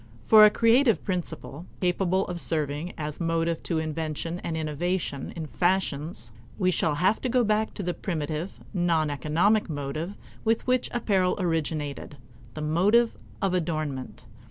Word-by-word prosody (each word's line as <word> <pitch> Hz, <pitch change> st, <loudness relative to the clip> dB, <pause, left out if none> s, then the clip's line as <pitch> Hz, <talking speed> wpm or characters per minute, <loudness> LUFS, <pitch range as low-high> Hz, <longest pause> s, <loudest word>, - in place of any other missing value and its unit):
For 215 Hz, -1 st, +8 dB
a -, -, +8 dB
creative 230 Hz, +3 st, +3 dB
principle, 170 Hz, -3 st, -4 dB
capable 185 Hz, +1 st, +1 dB
of 175 Hz, -1 st, -4 dB
serving 155 Hz, +1 st, -2 dB
as 150 Hz, +1 st, -5 dB
motive 165 Hz, 0 st, 0 dB
to 165 Hz, -, -2 dB
invention 160 Hz, +2 st, -3 dB
and 165 Hz, -2 st, -3 dB
innovation 155 Hz, -1 st, -2 dB
in 165 Hz, -2 st, -4 dB
fashions, 160 Hz, -8 st, -1 dB, 0.3 s
we 185 Hz, -2 st, +2 dB
shall 155 Hz, -3 st, +1 dB
have 185 Hz, +7 st, +2 dB
to 255 Hz, -, -1 dB
go 250 Hz, 0 st, +3 dB
back 215 Hz, 0 st, 0 dB
to 200 Hz, -, -4 dB
the 175 Hz, 0 st, -1 dB
primitive, 160 Hz, -1 st, -4 dB
non 165 Hz, -5 st, +1 dB
economic 165 Hz, -, +2 dB
motive 155 Hz, +5 st, -4 dB, 0.3 s
with 225 Hz, 0 st, +1 dB
which 255 Hz, -1 st, +1 dB
apparel 195 Hz, -6 st, +1 dB
originated 155 Hz, -5 st, -2 dB, 0.4 s
the 155 Hz, -, -5 dB
motive 205 Hz, +10 st, +3 dB, 0.3 s
of 195 Hz, -2 st, +2 dB
adornment. 155 Hz, -, -3 dB
170 Hz, 145 wpm, -27 LUFS, 155-190 Hz, 0.4 s, For